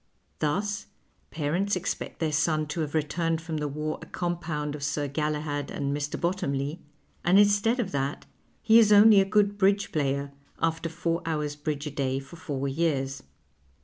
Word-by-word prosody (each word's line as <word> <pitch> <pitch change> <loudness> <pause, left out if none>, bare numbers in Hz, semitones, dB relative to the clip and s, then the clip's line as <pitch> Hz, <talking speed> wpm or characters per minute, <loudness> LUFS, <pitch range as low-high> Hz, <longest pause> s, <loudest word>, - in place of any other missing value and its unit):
Thus, 200 +7 -1 0.4
parents 170 +7 0
expect 185 +1 -4
their 160 -2 0
son 155 +1 +1
to 150 - -3
have 155 -1 -2
returned 165 +2 0
from 160 -1 -4
the 150 -1 -1
war 150 +2 -3
a - - -10
compound 170 -4 -3
of 150 - -7
Sir 145 0 -1
Galahad 150 0 -2
and 140 0 -2
Mr. 145 +2 -3
Bottomley, 155 -4 -1 0.4
and 180 +3 +5
instead 205 +4 +4
of 200 -6 -1
that 140 0 -2 0.4
he 225 +1 +7
is 215 -2 +5
only 210 0 +8
a - - +2
good 205 0 +2
bridge 200 +1 +2
player, 140 -1 -1 0.3
after 165 0 0
four 170 +1 -2
hours' 150 -3 -2
bridge 150 0 -3
a 150 - -4
day 135 -2 -1
for 135 +5 -12
four 145 -6 -3
years. 135 -2 -1
155 Hz, 170 wpm, -27 LUFS, 145-180 Hz, 0.4 s, only